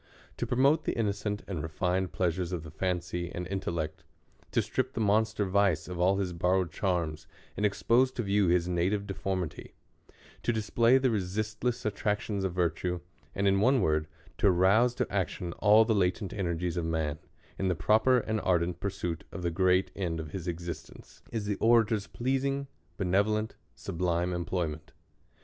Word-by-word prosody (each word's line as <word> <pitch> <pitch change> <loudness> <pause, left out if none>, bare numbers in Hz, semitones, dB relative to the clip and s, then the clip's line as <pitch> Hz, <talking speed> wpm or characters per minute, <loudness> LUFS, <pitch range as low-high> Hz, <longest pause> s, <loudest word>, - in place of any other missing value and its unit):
To - - -2
promote 140 +5 +3
the - - -1
innocent 105 -1 -1
and 90 -6 -3
rehned 90 +4 -1
pleasures 90 0 -1
of 85 -4 -3
the 80 - -9
fancy 90 0 -2
and 90 - -4
intellect; 85 -4 -3 0.5
to - - +1
strip 130 0 -2
the - - -4
monster 110 0 +2
vice 95 -4 +2
of 90 -1 -6
all 95 +2 +3
his 95 -3 -2
borrowed 90 0 +1
charms, 85 -5 -2 0.3
and 105 - +2
expose 120 +5 +2
to 120 - -2
view 100 -1 +2
his 85 0 +2
native 90 +4 0
defor 95 0 -2
mity; 85 -5 -6 0.7
to - - +1
display 115 +3 +3
the 130 -1 +2
resisdess 110 +5 -2
attractions 105 -1 -1
of 95 - 0
virtue; 90 0 0 0.4
and, 100 0 +1
in 95 0 +4
one 130 +4 +4
word, 75 -5 +1 0.3
to 100 - +5
rouse 100 +7 +4
to - - -2
action 85 -1 -2
all 110 +1 +6
the 110 - +2
latent 95 0 0
ener 85 -5 -2
gies 90 0 -2
of 85 - -1
man, 80 -2 -1 0.4
in 95 - 0
the 90 - +1
proper 110 +8 +4
and 110 -1 -2
ardent 90 -1 +1
pursuit 90 -4 -3
of 90 - -6
the 85 - 0
great 95 +1 +2
end 85 -4 -2
of 80 -2 -6
his 90 0 -5
existence, 85 -1 -7
is 110 -3 -3
the 105 -1 -1
orator's 110 -3 +3
pleasing, 135 +2 -1 0.3
be 95 - -1
nevolent, 105 +4 +1 0.2
sublime 90 +1 -1
employment. 85 -3 -3
95 Hz, 170 wpm, -29 LUFS, 85-110 Hz, 0.7 s, all